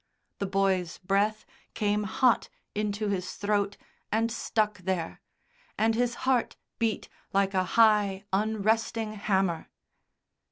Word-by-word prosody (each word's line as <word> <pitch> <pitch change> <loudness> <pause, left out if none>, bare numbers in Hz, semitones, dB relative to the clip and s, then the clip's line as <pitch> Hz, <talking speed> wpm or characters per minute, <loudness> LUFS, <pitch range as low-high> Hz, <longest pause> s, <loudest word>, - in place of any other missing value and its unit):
The 200 - -1
boy's 190 -3 +1
breath 200 +3 0 0.3
came 210 -1 +1
hot 245 +5 +2 0.2
into 210 0 -1
his 185 -2 -2
throat 205 -1 0 0.3
and 225 +2 +1
stuck 215 -2 0
there, 185 -2 -3 0.6
and 225 +1 +3
his 240 +1 0
heart 255 -3 +2 0.2
beat 225 -2 0 0.3
like 195 0 +2
a 185 -1 +2
high, 210 -4 +4
unresting 220 +1 +1
hammer. 190 -5 0
205 Hz, 115 wpm, -28 LUFS, 195-220 Hz, 0.6 s, high